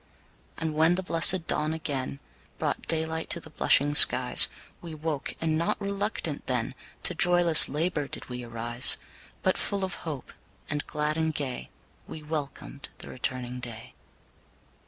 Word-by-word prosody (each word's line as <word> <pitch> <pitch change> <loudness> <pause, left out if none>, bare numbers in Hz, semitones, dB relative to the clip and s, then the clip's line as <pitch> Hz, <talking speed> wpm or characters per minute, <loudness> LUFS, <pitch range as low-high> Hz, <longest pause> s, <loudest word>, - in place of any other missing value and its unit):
And 160 -1 -4
when 160 +3 +1
the 190 - -5
blessed 170 0 +6
dawn 155 0 -1
again 140 -3 -6 0.4
Brought - - -5
daylight 160 0 0
to 170 - +5
the - - -15
blushing 145 +1 +1
skies, - - +6 0.3
We 165 -2 -10
woke, 155 -2 -6
and 160 -1 -2
not 170 - -3
RELUCTANT 200 -6 -5
then, 125 0 -3 0.3
To - - -4
joyless 175 -2 +6
LABOUR 150 -1 -3
did - - -9
we 125 -1 -8
rise; 120 +1 +4 0.5
But 185 - -1
full 200 -1 -3
of 185 - -4
hope, 150 -6 -8 0.3
and 150 0 -6
glad 150 0 -4
and 160 0 -2
gay, 135 -4 -6 0.4
We 155 - -11
welcomed 150 -2 -7
the - - -12
returning 125 -1 -6
day. 115 -2 -10
155 Hz, 150 wpm, -25 LUFS, 135-165 Hz, 0.5 s, blessed